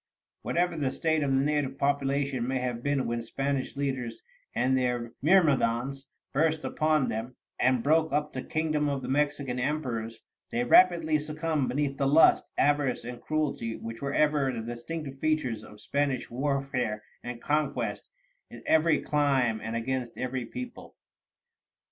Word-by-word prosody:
Whatever 175 0 0
the 145 -4 0
state 160 +3 0
of 140 -2 0
the 135 - +3
native 145 -2 0
population 140 -2 0
may 130 0 0
have 125 -2 -2
been 145 0 0
when 120 0 -1
Spanish 135 +4 -2
leaders 130 -4 -3 0.3
and 130 +1 +2
their 125 -2 0
myrmidons 135 -6 +2 0.3
burst 155 +2 +1
upon 155 -3 +2
them, 115 +3 -4 0.2
and 130 -2 +3
broke 160 +2 +3
up 150 +1 0
the 130 - -3
kingdom 155 +1 0
of 140 -2 -2
the - - -4
Mexican 145 -2 0
emperors, 125 -5 -2 0.3
they 120 - 0
rapidly 165 +2 +5
succumbed 150 -1 -1
beneath 140 +1 -1
the 140 - +2
lust, 150 +4 +6
avarice, 145 -2 +2
and 120 0 -7
cruelty 145 -7 -1
which 115 0 -7
were 140 0 -2
ever 150 -2 +2
the 115 -3 -4
distinctive 135 +5 -6
features 135 -9 0
of 105 - -13
Spanish 140 +1 -1
warfare 125 -4 -1 0.2
and 120 -1 -6
conquest 150 +1 -1 0.4
in - - -11
every 160 0 +4
clime 135 -7 +2
and 110 +1 -4
against 125 +1 -2
every 130 -1 -3
people. 250 - -8
135 Hz, 150 wpm, -28 LUFS, 125-150 Hz, 0.4 s, lust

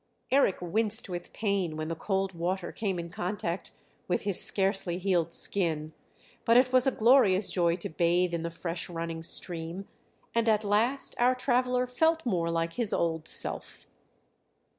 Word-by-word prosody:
Eric 265 -8 +3
winced 215 +5 +2
with 175 -1 -6
pain 195 -7 -1
when 155 0 -4
the 165 - -3
cold 195 +2 -2
water 175 +1 -3
came 200 -5 -3
in 170 0 -6
contact 180 -2 -3 0.4
with 175 - -1
his 200 -3 +3
scarcely 195 -3 0
healed 175 -3 0
skin; 160 -5 -2 0.5
but 230 +1 +4
it 255 0 +3
was 255 0 +5
a - - +4
glorious 220 -5 +4
joy 170 -2 +2
to 175 - -4
bathe 170 +2 +1
in 170 - -1
the 170 - -3
fresh 170 +1 -5
running 165 -1 -5
stream, 170 +2 -1 0.5
and 230 -1 +2
at 215 -1 +2
last 225 +7 +1
our 250 +1 +4
traveller 250 0 +1
felt 320 +5 +1
more 175 -7 0
like 165 0 -1
his 235 0 -2
old 160 -2 -1
self. - - -4
190 Hz, 160 wpm, -28 LUFS, 170-225 Hz, 0.5 s, was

